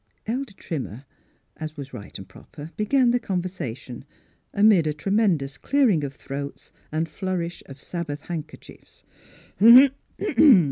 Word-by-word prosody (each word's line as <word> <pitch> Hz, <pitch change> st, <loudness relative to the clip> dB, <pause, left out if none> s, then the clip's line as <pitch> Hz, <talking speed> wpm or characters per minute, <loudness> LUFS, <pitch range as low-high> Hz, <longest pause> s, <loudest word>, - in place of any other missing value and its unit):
Elder 245 Hz, 0 st, -3 dB
Trimmer, 135 Hz, -, -6 dB, 0.5 s
as 155 Hz, 0 st, -7 dB
was 135 Hz, -2 st, -8 dB
right 100 Hz, -5 st, -9 dB
and 95 Hz, -, -10 dB
proper, 145 Hz, -, -12 dB
began 245 Hz, +3 st, +2 dB
the 245 Hz, -, +2 dB
conversation, 175 Hz, -, -5 dB, 0.5 s
amid 200 Hz, -6 st, +4 dB
a 150 Hz, -, 0 dB
tre 155 Hz, +6 st, -4 dB
mendous 170 Hz, -11 st, +1 dB
clearing 250 Hz, -, +2 dB
of 140 Hz, -1 st, -5 dB
throats 140 Hz, +1 st, -7 dB, 0.2 s
and 160 Hz, +2 st, -1 dB
flourish 175 Hz, +1 st, -4 dB
of 135 Hz, 0 st, -11 dB
Sabbath 150 Hz, -3 st, -5 dB
handkerchiefs. 155 Hz, -3 st, -9 dB
160 Hz, 125 wpm, -24 LUFS, 140-195 Hz, 0.5 s, amid